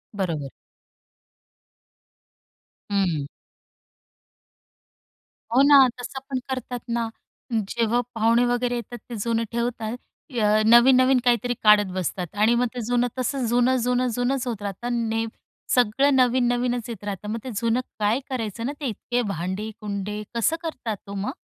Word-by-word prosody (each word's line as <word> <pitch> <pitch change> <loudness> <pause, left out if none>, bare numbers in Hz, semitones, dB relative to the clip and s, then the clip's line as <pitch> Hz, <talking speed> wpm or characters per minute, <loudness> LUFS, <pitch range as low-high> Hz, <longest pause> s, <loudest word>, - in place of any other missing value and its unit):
बरोबर. 165 -8 -2 2.4
हम्म. 175 -8 0 2.3
हो 260 - +6
ना, 280 -2 +8
तसं 255 +2 -6
पण 265 -2 -1
करतात 255 -1 -4
ना, 235 -1 -1 0.4
जेव्हा 230 +2 0 0.2
पाहुणे 230 +2 +3
वगैरे 245 0 0
येतात 240 0 -6
ते 240 - -5
जुनं 230 -1 0
ठेवतात. 235 -1 -2 0.4
अ, 210 0 +4
नवीन-नवीन 255 +3 +6
काहीतरी 245 0 +2
काढत 210 -3 +6
बसतात 180 0 -3
आणि 215 +3 +3
मग 245 +1 +2
ते 250 - -4
जुनं 245 +1 +2
तसं 255 +1 -1
जुनं-जुनं-जुनंच 245 +1 +1
होत 225 -4 -3
राहतं 235 +4 -3
ने 225 0 0 0.5
सगळं 250 +4 +3
नवीन-नवीनच 245 -1 +2
येत 220 -4 -7
राहतं, 205 0 -5
मग 225 +2 -2
ते 260 - -6
जुनं 230 +3 +1 0.2
काय 210 +4 +2
करायचं 230 -3 -3
ना 270 - -1
ते 295 - -5
इतके 245 +2 -2
भांडी-कुंडे? 205 +3 -4
कसं 235 +7 +2
करतात 230 - -5
ओ - - -6
मग? 200 +4 -2
235 Hz, 130 wpm, -24 LUFS, 210-245 Hz, 2.4 s, ना